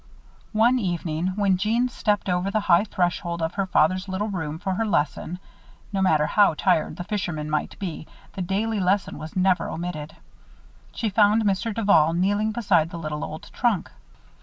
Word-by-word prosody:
One 235 +4 +4
evening, 175 -4 -2
when 200 -2 +2
Jeanne 225 +6 +1
stepped 210 -4 -1
over 180 +1 0
the 215 +1 0
high 185 0 +4
threshold 175 -3 -1
of 165 +1 -2
her 195 -1 -1
father's 185 +3 +2
little 200 +3 -2
room 160 -6 -4
for 190 +3 -2
her 225 +4 -1
lesson 170 -1 -1 0.6
no 195 - 0
matter 155 -5 +3
how 200 -3 +3
tired 155 +1 +1
the 175 - -5
fisherman 175 -6 -3
might 150 -1 -2
be, 175 -5 -6 0.3
the 190 - -5
daily 205 +4 -1
lesson 195 +2 0
was 155 - -8
never 185 -1 +2
omitted 160 -3 -5 0.8
she 220 -3 -2
found 210 +2 +4
Mr. 205 +3 0
Duval 200 -8 +3
kneeling 205 +4 +1
beside 195 -8 +2
the 170 - -7
little 155 -2 -4
old 160 +7 -8
trunk. 230 -8 0
185 Hz, 170 wpm, -24 LUFS, 165-205 Hz, 0.8 s, One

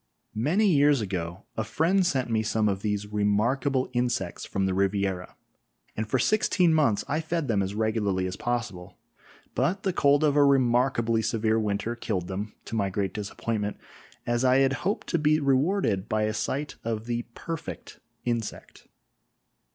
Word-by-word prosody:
Many 155 - +2
years 145 -6 +4
ago 95 -2 -4
a 110 - -1
friend 170 - +2
sent 135 -8 0
me 115 -2 +1
some 110 0 +1
of 95 -1 -1
these 105 -1 -1
remarkable 110 +6 +1
insects 120 -7 -1
from 95 -1 -1
the 95 - 0
Riviera, 95 -1 -1 0.6
and 110 0 -3
for 130 - +2
sixteen 180 - +3
months 140 -10 +2
I 155 +3 0
fed 160 -2 -2
them 105 -5 +1
as 95 +1 -3
regularly 105 -4 0
as 95 0 -3
possible, 115 -8 -4 0.6
but 195 +3 0
the 190 - 0
cold 145 -2 +3
of 145 -2 +3
a 145 - +6
remarkably 125 -3 +3
severe 110 0 +1
winter 105 +2 -1
killed 100 -7 -3
them, 100 +3 -5
to - - -5
my 100 -3 +1
great 95 -1 -2
disappointment, 105 0 -3 0.5
as 120 +1 0
I 130 0 +5
had 135 0 +3
hoped 185 +10 -2
to 170 - +1
be 155 +1 +3
rewarded 135 - +1
by 110 -1 +1
a 110 0 0
sight 140 +6 -3
of 110 -1 -3
the 120 0 -3
perfect 165 -2 -7 0.3
insect. 115 -3 -4
115 Hz, 165 wpm, -27 LUFS, 105-140 Hz, 0.6 s, a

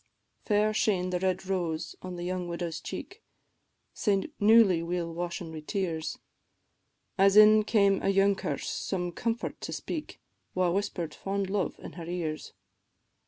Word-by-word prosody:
Fair 210 +1 +2
shane 185 -4 +1
the 180 - 0
red 185 0 -1
rose 165 -4 -2
on 185 -1 -6
the 175 - -5
young 180 0 -2
widow's 170 -1 -4
cheek, 390 +4 -7 0.7
Sae 200 +4 0
newly 210 -5 +6
weel 170 0 -3
washen 175 0 -4
wi' 160 - -6
tears, 165 -1 -3 1.0
As 195 +1 +5
in 215 0 +8
came 200 -3 +3
a - - +1
younker 195 -7 +2
some 180 -2 -3
comfort 230 +6 -3
to - - -5
speak, 315 -3 -5 0.4
Wha 180 -1 +2
whisper'd 175 -4 -2
fond 195 -1 -3
love 200 -2 -1
in - - -9
her 170 -2 -8
ears. 165 -3 -4
185 Hz, 145 wpm, -29 LUFS, 170-200 Hz, 1.0 s, in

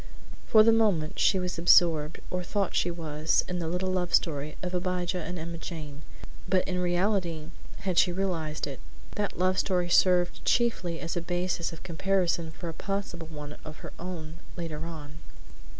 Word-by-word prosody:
For 215 -1 +7
the 225 - +6
moment 205 -9 +2
she - - +4
was 180 -2 -2
absorbed, 165 -3 +4
or 180 - -1
thought 195 +1 -1
she 175 - +2
was, 155 -2 0
in 180 0 -2
the 165 - -2
little 180 +3 -1
love 180 -1 +2
story 150 -2 0
of 180 0 -3
Abijah 180 0 -1
and 180 +2 -4
Emma 170 0 -5
Jane, 150 -4 -7 0.5
but 185 -1 +2
in 180 -1 -1
reality, 175 -3 0 0.3
had 185 -3 +2
she 180 - +4
realized 175 -5 -2
it, 140 -2 -6 0.3
that 205 -1 -2
love 185 +1 +2
story 180 -2 +1
served 180 0 +4
chiefly 185 -9 +1
as 165 - -4
a 175 - -1
basis 175 0 -1
of 165 - -10
comparison 175 -2 0
for 170 +2 -7
a 165 - -4
possible 195 -3 -4
one 150 -2 -8
of 155 0 -8
her - - -8
own, 170 -2 -6 0.2
later 165 -2 -4
on. 155 -2 -8
175 Hz, 175 wpm, -28 LUFS, 160-185 Hz, 0.5 s, For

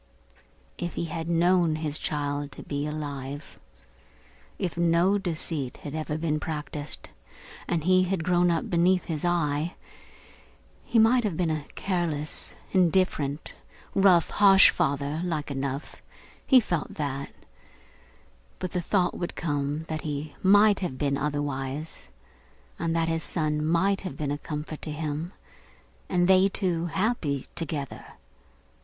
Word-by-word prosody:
If 175 -1 -4
he - - -1
had 165 0 -4
known 170 -1 +3
his 155 -1 -2
child 145 -1 -2
to - - -9
be 145 0 -3
alive; 145 -1 -6 1.0
if 180 -3 -2
no 170 +4 +3
deceit 160 -7 -3
had 145 - -5
been 155 0 -2
ever 155 - 0
practised, 150 -1 -4 0.6
and 165 -3 0
he 185 +1 +4
had 185 -2 -1
grown 175 0 +3
up 165 -1 0
beneath 180 +2 +3
his 155 -3 -3
eye; 165 -2 0 1.1
he - - 0
might 235 +3 +5
have 195 -7 -1
been 170 -3 +1
a 155 -2 -3
careless, 165 -6 -1 0.2
indifferent, 170 -5 +1 0.4
rough, 185 -4 +5
harsh 195 -1 +7
father 140 +3 -1
like 155 -5 -2
enough 135 +1 -4 0.5
he 265 - +8
felt 175 -9 -2
that; 140 -2 -3 1.3
but 185 -2 -4
the 180 - -1
thought 180 +1 +1
would 175 - -4
come 145 -1 -2
that 155 -1 -3
he 145 -1 -4
might 205 +1 +6
have 175 -9 -3
been 140 0 +1
otherwise, 145 +1 -3 0.7
and 165 0 0
that 165 0 +1
his 165 0 0
son 150 -3 -1
might 180 +5 +2
have 185 -8 -6
been 145 -2 -2
a 145 - -2
comfort 150 0 -6
to 155 - -4
him, 155 +2 -3 0.8
and 175 -1 +2
they 190 +1 +6
two 175 -4 -1
happy 175 - -1
together. 150 -4 -4
160 Hz, 135 wpm, -27 LUFS, 145-180 Hz, 1.3 s, he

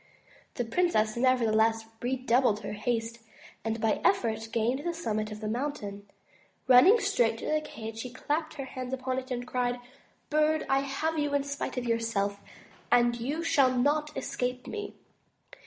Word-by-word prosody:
The 245 - -1
princess 230 -6 +1
nevertheless 225 -3 +3 0.2
redoubled 245 -3 +2
her 205 - -5
haste 230 +1 -2 0.4
and 225 0 -2
by 220 -1 +1
effort 225 - +1
gained 235 +3 +1
the 345 0 -2
summit 215 -9 -2
of 210 +1 -7
the 215 - -3
mountain. 210 -5 -4 0.6
Running 260 - +8
straight 240 - +2
to - - -7
the 310 0 +1
cage 225 -6 -7
she 250 - -5
clapped 305 +5 -2
her 275 -3 -5
hands 255 -1 -6
upon 260 0 -2
it 260 0 -10
and 245 -1 -3
cried: 245 -1 -1 0.5
''Bird, 305 +1 +2
I 270 - +3
have 290 +4 -2
you 290 -1 0
in 285 - +2
spite 280 -1 -4
of 250 - -2
yourself, 225 -4 0 0.5
and 240 0 +4
you 290 +8 -2
shall 275 -6 +3
not 300 +4 +1
escape 250 0 -3
me." 415 -1 -6
250 Hz, 160 wpm, -29 LUFS, 225-285 Hz, 0.6 s, Running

